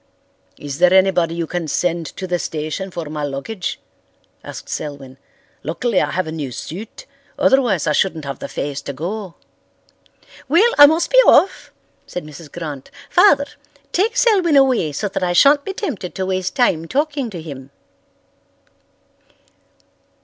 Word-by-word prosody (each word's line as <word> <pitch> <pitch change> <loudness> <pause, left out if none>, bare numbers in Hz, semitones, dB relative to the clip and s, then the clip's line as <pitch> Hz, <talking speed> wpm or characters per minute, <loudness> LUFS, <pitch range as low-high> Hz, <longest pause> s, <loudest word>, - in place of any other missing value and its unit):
"Is 145 -1 -7
there 180 - +5
anybody 180 -3 +3
you 170 -1 -2
can 170 0 -4
send 170 +1 -1
to 190 - -4
the 175 -1 -1
station 155 +5 -4
for 170 -2 -6
my 150 0 -5
luggage?" 145 +8 -4 0.6
asked - - -9
Selwyn. 135 -3 -6 0.4
"Luckily 190 - 0
I - - 0
have 185 - -1
a 160 - -6
new 150 -5 -5
suit, 210 - -8 0.3
otherwise 240 - +3
I - - +1
shouldn't 160 -1 0
have 140 -2 -5
the - - -5
face 140 0 -4
to 140 - -6
go." 180 +6 -5 1.1
"Well, 405 - +4
I 290 - +11
must 320 +3 +1
be - - +3
off," 380 - +4 0.4
said 180 - -6
Mrs. 150 0 -12
Grant. 150 -6 -7 0.2
"Father, 285 -9 +5 0.5
take 450 +6 0
Selwyn 395 -11 +3
away 255 - +3
so 205 +9 -2
that 195 - -4
I 180 -1 0
shan't 285 +10 +5
be 390 - -5
tempted 275 - -5
to 190 - -2
waste 185 0 -2
time 175 - +1
talking 285 - -1
to 185 -5 -7
him." 140 -4 -9
180 Hz, 155 wpm, -19 LUFS, -, 1.1 s, I